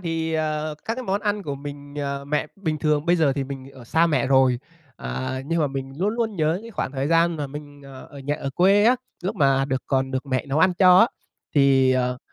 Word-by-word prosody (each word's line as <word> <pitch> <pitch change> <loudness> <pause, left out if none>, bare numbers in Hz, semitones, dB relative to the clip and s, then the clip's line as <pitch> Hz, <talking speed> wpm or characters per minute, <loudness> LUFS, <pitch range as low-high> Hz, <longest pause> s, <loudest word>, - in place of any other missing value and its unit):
thì, 165 -2 -2
ờ, 155 -1 -1
các 225 - -2
cái 255 - -5
món 200 -3 -1
ăn 205 -1 -1
của 145 -4 -4
mình 145 0 -9
ờ, 140 -1 -3
mẹ 150 +1 -1
bình 160 -6 -2
thường 150 +1 0
bây 175 - +4
giờ 155 -5 +3
thì 135 0 -2
mình 135 0 -8
ở 130 -3 -13
xa 165 +8 +3
mẹ 135 -7 +1
rồi, 130 -2 +4 0.4
ờ, 65 - -4
nhưng 165 +2 0
mà 150 - +2
mình 135 -1 -5
luôn 205 +4 0
luôn 225 -3 -2
nhớ 160 +2 +1
những 230 - -10
khoảng 135 - -3
thời 135 +1 -2
gian 165 0 +3
mà 145 -2 -3
mình, 145 0 -10
ờ, 135 -1 -11
ở 145 - -11
nhà, 145 +2 -2
ở 135 - -4
quê 195 +8 +4
á 245 +2 +5 0.3
lúc 195 +4 -3
mà 135 -4 +3
được 130 -1 -2
còn 135 -1 0
được 130 +1 -3
mẹ 130 -1 -1
nấu 140 +2 -1
ăn 185 +2 +4
cho 185 -1 +7
á. 225 - +7 0.5
Thì 135 -2 +4
ờ, 125 -1 0
145 Hz, 250 wpm, -23 LUFS, 135-170 Hz, 0.5 s, cho